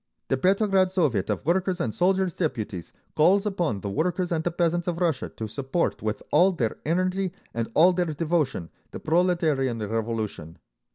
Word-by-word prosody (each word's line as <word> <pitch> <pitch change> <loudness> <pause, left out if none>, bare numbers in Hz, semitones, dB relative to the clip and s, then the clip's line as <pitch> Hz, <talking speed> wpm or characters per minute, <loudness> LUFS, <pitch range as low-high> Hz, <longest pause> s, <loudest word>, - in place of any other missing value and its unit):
The 135 - +2
Petrograd 190 +3 +3
Soviet 150 - 0
of 105 +2 -2
Workers' 185 +2 +1
and 115 -9 -1
Soldiers' 185 0 +1
Deputies 110 - -3 0.2
calls 190 +6 +4
upon 175 - -1
the 100 - -4
workers 175 - -1
and 160 -2 0
the 175 - +1
peasants 175 0 0
of 175 -1 -1
Russia 165 -7 0
to 110 - -4
support 135 +8 -2
with 110 -1 -3
all 180 +6 +5
their 120 -10 -2
energy 185 +2 0 0.2
and 115 0 -2
all 175 +4 +6
their 180 0 +1
devotion 155 - -1 0.2
the - - -8
Proletarian 160 -7 +1
Revolution. 110 -6 -3
165 Hz, 165 wpm, -25 LUFS, 115-180 Hz, 0.2 s, all